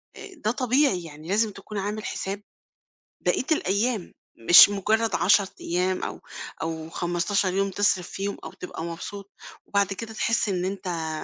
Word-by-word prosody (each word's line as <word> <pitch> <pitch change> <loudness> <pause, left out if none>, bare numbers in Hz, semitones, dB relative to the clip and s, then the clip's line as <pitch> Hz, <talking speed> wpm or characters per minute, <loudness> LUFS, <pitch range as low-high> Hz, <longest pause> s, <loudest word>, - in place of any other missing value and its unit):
آآ، 420 -1 -10 0.2
ده 215 - +3
طبيعي 255 -6 +2
يعني، 155 -1 -11
لازم 215 +2 +2
تكون 200 +2 -9
عامل 205 +2 -3
حساب 195 +2 -4 0.8
بقية - - +1
الأيام، 210 - 0 0.4
مش 175 +3 +11
مجرّد 215 +3 +1
10 200 +1 +4
أيام 185 +2 -1
أو - - -5 0.4
أو 160 0 -4
15 175 +3 0
يوم 195 +1 +1
تصرِف 190 -2 +1
فيهم 200 +1 -4
أو - - -8
تبقى 180 -2 -7
مبسوط، 190 +4 -7 0.3
وبعد 200 -1 +1
كده 220 +3 -7
تحس 230 0 +1
إن 180 -2 -1
أنت 180 -4 -3
195 Hz, 150 wpm, -25 LUFS, 180-210 Hz, 0.8 s, مش